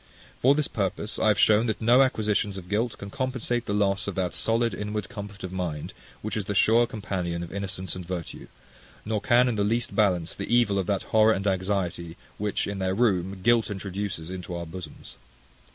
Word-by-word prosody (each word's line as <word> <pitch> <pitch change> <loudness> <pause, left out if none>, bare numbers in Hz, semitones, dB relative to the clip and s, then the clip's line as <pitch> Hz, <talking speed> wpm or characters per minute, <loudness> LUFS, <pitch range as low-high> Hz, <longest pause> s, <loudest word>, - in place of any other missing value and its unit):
For 135 +3 +5
this 150 -1 +1
purpose 100 +1 -2
I - - +2
have 105 -1 +4
shown 110 +3 +5
that 110 - -1
no 120 +3 +5
acquisitions 105 -5 +1
of 90 -2 -9
guilt 110 +3 0
can 100 0 -8
compensate 130 -2 -2
the 100 - -1
loss 100 -1 +1
of 100 - -3
that 90 -2 -1
solid 115 +1 +1
inward 105 0 -4
comfort 100 -1 -8
of 95 - -5
mind, 85 -5 -4 0.3
which 110 - -3
is 105 -3 -2
the 100 - -3
sure 115 +4 +5
companion 90 -6 -3
of 85 - -8
innocence 95 -1 -3
and 90 - -6
virtue; 85 -1 -6 0.6
nor 105 -1 -1
can 120 +4 +4
in 120 -3 -1
the 100 - +2
least 115 +3 0
balance 90 -6 +2
the 100 - -5
evil 120 -5 +3
of 95 - -2
that 100 -2 0
horror 110 0 +6
and 100 -1 -3
anxiety 95 -3 -1 0.2
which, 105 0 0
in 100 -1 -4
their 95 0 0
room, 95 -4 +1
guilt 120 -1 +4
introduces 95 -3 -4
into 90 -1 -6
our 85 0 -4
bosoms. 80 -2 -10
100 Hz, 200 wpm, -26 LUFS, 95-110 Hz, 0.6 s, horror